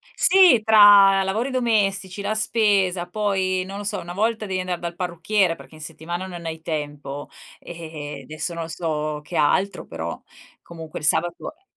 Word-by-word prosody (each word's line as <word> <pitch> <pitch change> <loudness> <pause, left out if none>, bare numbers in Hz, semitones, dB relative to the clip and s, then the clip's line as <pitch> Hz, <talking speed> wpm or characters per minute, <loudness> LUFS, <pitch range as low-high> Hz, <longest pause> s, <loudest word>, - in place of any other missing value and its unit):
Sì, 360 -10 +6
tra 205 -3 +7
lavori 215 +7 -1
domestici, 205 -6 0
la 205 - -1
spesa 200 -5 +1
poi, 190 -2 -1
non 195 +1 -7
lo - - -6
so, 205 - -3
una 175 +1 -8
volta 220 +3 -1
devi 190 -2 -3
andar 180 -1 -3
dal 170 0 -5
parrucchiere 180 +1 0
perché 160 - -15
in 155 - -13
settimana 165 +3 -6
non 175 -2 -9
hai 160 0 -5
tempo. 145 -3 -5 0.3
E 160 -4 -8
eh, - - -11
adesso 155 +4 -5
non 165 -1 -5
so 155 -3 -3
che 150 - -9
altro, 190 +7 +1
però - - -6 0.4
comunque 165 -2 -9
il 150 - -5
sabato 170 - 0
è 365 - -37
180 Hz, 175 wpm, -22 LUFS, 160-205 Hz, 0.4 s, tra